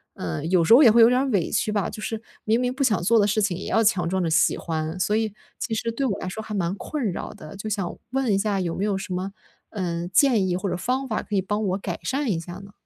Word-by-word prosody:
呃， 85 Hz, -, -4 dB
有 175 Hz, -1 st, +3 dB
时 225 Hz, -, +5 dB
候 265 Hz, -, +9 dB
也 240 Hz, -, +8 dB
会 235 Hz, +2 st, +6 dB
有 230 Hz, -, +7 dB
点 250 Hz, +1 st, +3 dB
儿 275 Hz, -, -1 dB
委 195 Hz, -8 st, 0 dB
屈 215 Hz, -, 0 dB
吧。 205 Hz, -2 st, 0 dB
就 215 Hz, -, -7 dB
是 225 Hz, 0 st, -3 dB, 0.3 s
明 225 Hz, +2 st, +2 dB
明 250 Hz, 0 st, 0 dB
不 275 Hz, +1 st, -1 dB
想 215 Hz, -9 st, +2 dB
做 230 Hz, +4 st, +4 dB
的 205 Hz, -, +3 dB
事 215 Hz, +2 st, +1 dB
情 185 Hz, -3 st, 0 dB
也 -, -, -6 dB
要 225 Hz, -, +2 dB
强 180 Hz, -6 st, +2 dB
装 190 Hz, -1 st, 0 dB
着 -, -, 0 dB
喜 160 Hz, -, +3 dB
欢， 160 Hz, +1 st, -3 dB
所 210 Hz, +4 st, +1 dB
以 220 Hz, -2 st, 0 dB, 0.3 s
其 225 Hz, -, -2 dB
实 230 Hz, +1 st, -2 dB
对 250 Hz, +5 st, -3 dB
我 205 Hz, -, -1 dB
来 185 Hz, -, -5 dB
说 205 Hz, +4 st, -5 dB
还 215 Hz, -1 st, -6 dB
蛮 175 Hz, -1 st, 0 dB
困 240 Hz, -2 st, -3 dB
扰 -, -, -5 dB
的。 155 Hz, +5 st, -11 dB
就 210 Hz, +2 st, -5 dB
想 195 Hz, -4 st, -2 dB
问 260 Hz, -4 st, 0 dB
一 195 Hz, -, +2 dB
下 205 Hz, -2 st, 0 dB
有 170 Hz, -2 st, -2 dB
没 195 Hz, -, -2 dB
有 205 Hz, -2 st, 0 dB
什 190 Hz, -1 st, -5 dB
么， 185 Hz, +2 st, -3 dB, 0.4 s
呃， 175 Hz, -4 st, -3 dB
建 210 Hz, +1 st, +3 dB
议 180 Hz, -, 0 dB
或 190 Hz, +2 st, -3 dB
者 180 Hz, -, -1 dB
方 255 Hz, +8 st, -1 dB
法， 220 Hz, -, -1 dB
可 210 Hz, -, -5 dB
以 195 Hz, -, +3 dB
帮 205 Hz, +2 st, -1 dB
我 190 Hz, -1 st, 0 dB
改 180 Hz, -3 st, -5 dB
善 275 Hz, +1 st, -1 dB
一 165 Hz, -, -1 dB
下 175 Hz, +1 st, -8 dB
呢？ 200 Hz, +1 st, -11 dB
205 Hz, 315 characters per minute, -24 LUFS, 180-225 Hz, 0.4 s, 候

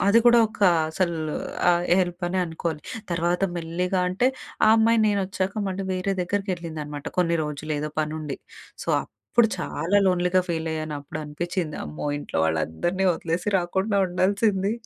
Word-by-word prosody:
అది 205 Hz, +3 st, +6 dB
కూడా 240 Hz, 0 st, +8 dB
ఒక 220 Hz, -, -15 dB, 0.3 s
అసలు 170 Hz, +1 st, 0 dB, 0.5 s
ఆహ్, 175 Hz, 0 st, +2 dB, 0.2 s
హెల్ప్ 180 Hz, 0 st, -2 dB
అనే 185 Hz, +1 st, -1 dB
అనుకోవాలి. 160 Hz, -1 st, -3 dB, 0.3 s
తర్వాత 175 Hz, +2 st, 0 dB
మెల్లిగా 180 Hz, +3 st, -1 dB
అంటే 195 Hz, +7 st, +2 dB, 0.4 s
ఆ -, -, +6 dB
అమ్మాయి, 225 Hz, +1 st, +4 dB
నేనొచ్చాక 195 Hz, -2 st, 0 dB, 0.2 s
మళ్ళీ 190 Hz, +1 st, -3 dB
వేరే 185 Hz, +2 st, -1 dB
దగ్గరికెళ్ళిందనమాట. 170 Hz, -6 st, -4 dB
కొన్ని 170 Hz, -2 st, +3 dB
రోజులు 150 Hz, +1 st, -4 dB
ఏదో 150 Hz, 0 st, -3 dB
పని 155 Hz, 0 st, -2 dB
ఉండి. 150 Hz, -3 st, -5 dB, 0.5 s
సో, -, -, -9 dB, 0.5 s
అప్పుడు 235 Hz, -2 st, +6 dB
చాలా 180 Hz, +1 st, 0 dB
లోన్లీగా 180 Hz, 0 st, +3 dB
ఫీల్ 165 Hz, -1 st, -1 dB
అయ్యాను. 155 Hz, -1 st, -3 dB
అప్పుడు 145 Hz, +2 st, -7 dB
అనిపిచ్చింది, 165 Hz, +2 st, -3 dB
అమ్మో! 75 Hz, 0 st, -6 dB
ఇంట్లో 145 Hz, -, -4 dB
వాళ్ళందరినీ 80 Hz, -, 0 dB
వదిలేసి 170 Hz, +3 st, -2 dB
రాకుండా 190 Hz, +4 st, 0 dB
ఉండాల్సింది. 195 Hz, +2 st, +1 dB
175 Hz, 145 wpm, -25 LUFS, 155-190 Hz, 0.5 s, కూడా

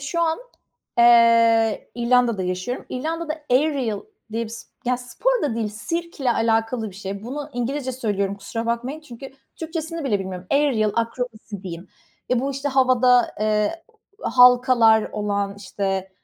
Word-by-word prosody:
şu 310 Hz, +5 st, -2 dB
an, 325 Hz, -1 st, +1 dB, 0.6 s
eee, 230 Hz, -2 st, +5 dB
İrlanda'da 240 Hz, -3 st, +2 dB
yaşıyorum. 185 Hz, +7 st, -3 dB
İrlanda'da 310 Hz, +3 st, -4 dB
aerial 260 Hz, -5 st, +1 dB, 0.3 s
diye 230 Hz, +1 st, -1 dB
bir -, -, -8 dB
s 230 Hz, -, -9 dB, 0.2 s
ya, 250 Hz, +1 st, +1 dB
spor 455 Hz, -, -1 dB
da 280 Hz, -6 st, 0 dB
değil, 225 Hz, -2 st, -1 dB
sirkle 280 Hz, +5 st, -3 dB
alakalı 225 Hz, 0 st, 0 dB
bir -, -, -16 dB
şey. 195 Hz, +1 st, -6 dB
Bunu 290 Hz, +4 st, -6 dB
İngilizce 260 Hz, +2 st, -2 dB
söylüyorum, 205 Hz, -5 st, -1 dB
kusura 225 Hz, +3 st, -5 dB
bakmayın; 245 Hz, +6 st, -2 dB
çünkü 270 Hz, -3 st, -10 dB, 0.3 s
Türkçesini 325 Hz, 0 st, -5 dB
bile 215 Hz, -7 st, +1 dB
bilmiyorum. 185 Hz, -1 st, -6 dB
Aerial 270 Hz, -7 st, +2 dB
akrobasi 230 Hz, -3 st, -4 dB
diyeyim. 175 Hz, -1 st, -8 dB, 0.4 s
Eee, 250 Hz, -1 st, +2 dB
bu 275 Hz, +2 st, -1 dB
işte 275 Hz, +1 st, -3 dB
havada, 255 Hz, -2 st, +3 dB
eee, 215 Hz, +10 st, 0 dB, 0.4 s
halkalar 245 Hz, -3 st, +5 dB
olan, 200 Hz, -1 st, -2 dB
işte. 195 Hz, -1 st, -3 dB
235 Hz, 140 wpm, -22 LUFS, 215-270 Hz, 0.6 s, eee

